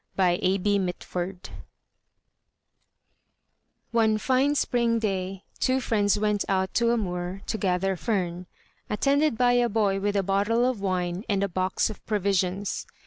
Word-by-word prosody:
VI 180 Hz, -2 st, +3 dB, 0.2 s
THE 205 Hz, +2 st, +2 dB
GRATEFUL 180 Hz, 0 st, -3 dB
FOXES 180 Hz, -, -12 dB, 2.4 s
One 220 Hz, -2 st, +3 dB
fine 265 Hz, +6 st, +2 dB
spring 235 Hz, -4 st, +1 dB
day 195 Hz, -3 st, -2 dB, 0.2 s
two 260 Hz, +1 st, +2 dB
friends 210 Hz, -5 st, +1 dB
went 210 Hz, -1 st, +1 dB
out 190 Hz, -1 st, 0 dB
to 235 Hz, 0 st, +2 dB
a 235 Hz, -, +2 dB
moor 180 Hz, -1 st, -4 dB
to 220 Hz, -, -3 dB
gather 190 Hz, 0 st, 0 dB
fern, 180 Hz, -4 st, -2 dB, 0.4 s
attended 280 Hz, +4 st, +2 dB
by 245 Hz, 0 st, +4 dB
a 245 Hz, -1 st, +3 dB
boy 200 Hz, -3 st, +1 dB
with 205 Hz, +1 st, -1 dB
a 200 Hz, -, +2 dB
bottle 205 Hz, +5 st, +1 dB
of 250 Hz, -6 st, -2 dB
wine 180 Hz, -1 st, -1 dB
and 200 Hz, -1 st, +1 dB
a -, -, +1 dB
box 185 Hz, +3 st, 0 dB
of 215 Hz, -, -12 dB
provisions. 195 Hz, -2 st, -1 dB
200 Hz, 145 wpm, -26 LUFS, 185-230 Hz, 2.4 s, by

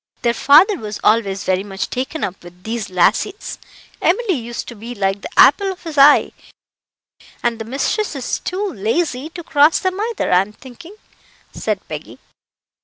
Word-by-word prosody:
"Their 235 Hz, -1 st, +2 dB
father 325 Hz, -, +5 dB
was 210 Hz, -4 st, -6 dB
always 200 Hz, -3 st, +2 dB
very 185 Hz, 0 st, 0 dB
much 195 Hz, -1 st, -5 dB
taken 265 Hz, +5 st, -3 dB
up 185 Hz, 0 st, -4 dB
with 175 Hz, +1 st, -15 dB
these 225 Hz, -1 st, -4 dB
lassies 210 Hz, -, 0 dB, 0.4 s
Emily 395 Hz, +3 st, +2 dB
used 240 Hz, -4 st, -5 dB
to 240 Hz, -, -9 dB
be 230 Hz, +3 st, -8 dB
like 195 Hz, -1 st, -1 dB
the -, -, -7 dB
apple 395 Hz, -1 st, +6 dB
of 370 Hz, -, -11 dB
his 325 Hz, -3 st, -7 dB
eye; 285 Hz, +1 st, +6 dB, 1.1 s
and 235 Hz, -1 st, 0 dB
the 225 Hz, -, -5 dB
mistress 285 Hz, -, -2 dB
is 260 Hz, -3 st, -3 dB
too 380 Hz, +3 st, -3 dB
lazy 255 Hz, -, -1 dB
to 345 Hz, +1 st, -9 dB
cross 295 Hz, 0 st, +4 dB
them 375 Hz, +1 st, -2 dB
either, 465 Hz, -, -2 dB
I'm 190 Hz, +3 st, +2 dB
thinking," 300 Hz, -, -13 dB, 0.6 s
said -, -, -3 dB
Peggy. -, -, -8 dB
245 Hz, 165 wpm, -18 LUFS, 210-335 Hz, 1.1 s, apple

